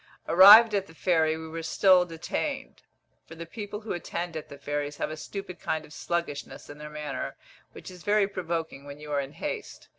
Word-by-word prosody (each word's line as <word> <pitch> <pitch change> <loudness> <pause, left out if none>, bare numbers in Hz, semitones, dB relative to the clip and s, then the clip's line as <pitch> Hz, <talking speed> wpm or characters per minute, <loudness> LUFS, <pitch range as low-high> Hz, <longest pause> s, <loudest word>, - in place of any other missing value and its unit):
Arrived 210 +6 +9
at 195 -1 0
the 160 - -16
ferry, 160 -3 +2
we 160 0 -7
were 165 +1 -5
still 180 +2 +4
detained, 165 -2 -4 0.5
for 165 - -11
the 165 +1 -7
people 205 +3 -7
who 220 - -4
attend 175 0 -4
at 155 - -6
the 140 - -10
ferries 145 0 -3
have - - -2
a - - -4
stupid 185 +2 -7
kind 155 0 -2
of 150 - -15
sluggishness 145 -2 -4
in 145 - -12
their 150 0 -8
manner, 150 -2 -5 0.4
which - - -10
is 180 -1 -12
very 205 +2 +2
provoking 165 -7 -4
when 145 0 -10
you 150 0 -9
are 145 -1 +1
in 135 +1 -8
haste. - - -6
165 Hz, 205 wpm, -27 LUFS, 150-185 Hz, 0.5 s, Arrived